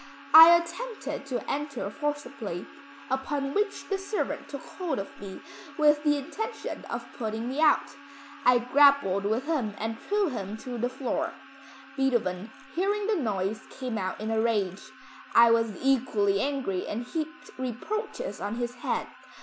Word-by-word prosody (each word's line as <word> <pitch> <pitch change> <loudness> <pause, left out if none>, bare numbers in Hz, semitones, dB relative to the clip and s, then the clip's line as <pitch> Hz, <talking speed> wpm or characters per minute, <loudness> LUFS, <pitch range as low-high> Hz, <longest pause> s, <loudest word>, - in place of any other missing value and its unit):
I 325 +2 +12
attempted 340 - -5
to 250 -3 -3
enter 280 -8 -3
forcibly, 275 - -4 0.5
upon 275 +1 -1
which 415 0 -1
the 390 -1 -1
servant 400 +2 -3
took 280 - -7
hold 350 -6 -4
of 195 - -4
me, 195 -2 -8 0.4
with 300 -1 +4
the 295 -1 +3
intention 430 +11 -5
of - - -5
putting 225 -1 -3
me 270 +3 -3
out. 310 -2 +3 0.5
I 250 0 +6
grappled 250 -6 +4
with 225 +6 0
him 260 -10 -1
and 225 +1 -3
threw 410 -3 +1
him 210 -4 -5
to 245 +1 -6
the 245 +2 0
floor. 260 0 -2 0.6
Beethoven 230 -7 0 0.2
hearing 400 +3 0
the 435 0 +2
noise 215 - -1
came 250 -4 -4
out 185 -1 -3
in 215 +1 -3
a 220 0 +2
rage. 205 -5 0 0.5
I 235 0 +8
was 230 -3 +2
equally 220 -7 +2
angry 270 -10 -1
and 230 +3 -3
heaped 315 +4 -5
reproaches 425 - -4
on 205 +2 -2
his 240 0 -2
head. - - -1
260 Hz, 150 wpm, -28 LUFS, 220-300 Hz, 0.6 s, I